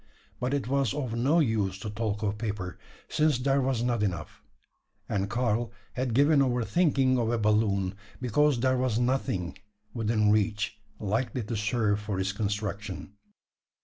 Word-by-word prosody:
But 130 +3 0
it 140 -4 -2
was 135 -3 +1
of 130 -6 -2
no 135 +8 +3
use 110 - +1
to 105 - -4
talk 105 -1 -2
of 105 0 -1
paper: 100 -5 -4 0.3
since 155 -3 +2
there 135 +2 +2
was 130 -3 0
not 120 -3 +1
enough; 90 -5 -3 0.7
and 100 0 -1
Karl 120 -1 0 0.2
had 125 -2 -1
given 145 +2 +5
over 125 -3 +1
thinking 135 - +3
of 115 -2 +1
a 120 - +1
balloon: 105 -3 +2 0.3
because 140 +2 +2
there 130 0 +3
was 125 -4 +1
nothing 120 -7 -1 0.3
within 110 -2 +2
reach 105 0 0 0.2
likely 115 +4 -1
to 115 +2 -4
serve 105 -1 +1
for 105 -2 -3
its 95 +1 0
construction. 105 -1 -3
115 Hz, 155 wpm, -28 LUFS, 105-130 Hz, 0.7 s, given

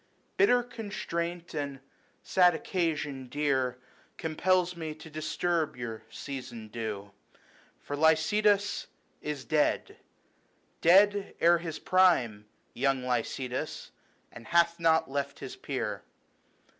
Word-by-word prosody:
Bitter 245 -11 +4
constraint 175 -7 -4
and 140 -3 -3 0.4
sad 180 -2 +4
occasion 150 -7 -2
dear 130 -3 0 0.4
Compels 180 +2 +1
me 160 -2 -5
to 155 +1 -12
disturb 155 +1 -1
your 115 -2 -5
season 120 -3 -7
due; 105 -3 -5 0.7
For 145 - -4
Lycidas 200 +7 +3 0.3
is 150 -3 -4
dead, 155 -2 +1 0.8
dead 200 +3 +5
ere 170 0 +5
his 165 -2 -5
prime, 130 - +3 0.3
Young 135 -2 +1
Lycidas, 125 0 -3 0.4
and 115 0 -12
hath 170 0 +3
not 160 -1 +3
left 140 0 -3
his - - -7
peer. - - -3
155 Hz, 105 wpm, -29 LUFS, 135-175 Hz, 0.8 s, dead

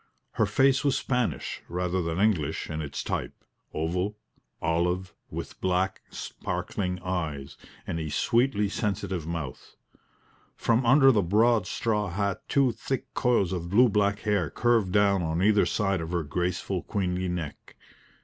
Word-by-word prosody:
Her - - +1
face 135 0 +3
was 140 -2 +2
Spanish 125 -3 -1
rather 90 +1 -1
than 85 +1 -2
English 85 -8 +1
in 75 +1 -3
its 70 -2 -4
type - - -3 0.4
oval, 90 +6 -2 0.4
olive, 90 +2 0 0.2
with - - -7
black, 95 +1 0
sparkling 90 -2 -4
eyes, 80 -7 -3 0.3
and 85 - -3
a 80 -1 -3
sweetly 120 - +2
sensitive 95 -5 -2
mouth. 80 -6 -6 0.8
From 115 +1 +1
under 135 +1 +7
the 105 -5 +3
broad 105 +3 +3
straw 105 -3 -1
hat 100 +1 -1
two 135 -3 +3
thick 130 +3 -4
coils 110 -7 +2
of 85 -1 -4
blue 120 +6 +5
black 100 0 +1
hair 100 -7 +1
curved 115 - +2
down 100 -1 +3
on 80 +2 -1
either 105 0 +4
side 95 -4 0
of 80 - -5
her 85 -2 0
graceful, 90 +4 -2
queenly 90 -2 -2
neck. 85 -4 -6
95 Hz, 145 wpm, -27 LUFS, 85-105 Hz, 0.8 s, under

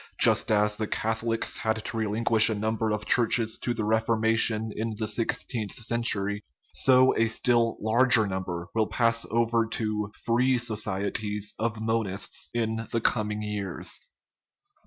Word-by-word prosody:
Just - - +6
as 105 0 +2
the 110 - -3
Catholics 115 +1 -1
had 110 0 -1
to 115 - -3
relinquish 110 +1 +2
a 110 - -1
number 110 +1 -2
of 105 0 -3
churches 115 -2 +1
to 120 - -2
the 115 -2 -3
Reforma 110 +1 +1
tion 110 -1 +2
in 110 0 -3
the 110 0 -3
sixteenth 110 -2 -2
century, 105 -3 -1 0.3
so 130 0 +4
a 115 - +2
still 115 0 +1
larger 115 +1 +3
number 95 -3 -4
will 110 -2 +1
pass 115 -1 +1
over 115 0 +1
to 105 -2 -3
" - - -21
free 125 +2 +2
societies 105 -2 -1
" - - -30
of 115 -1 -2
monists 110 -4 0
in 110 -1 -2
the 115 - 0
com 105 -2 0
ing 105 0 -4
years. 105 -2 -3
110 Hz, 155 wpm, -26 LUFS, 105-115 Hz, 0.3 s, Just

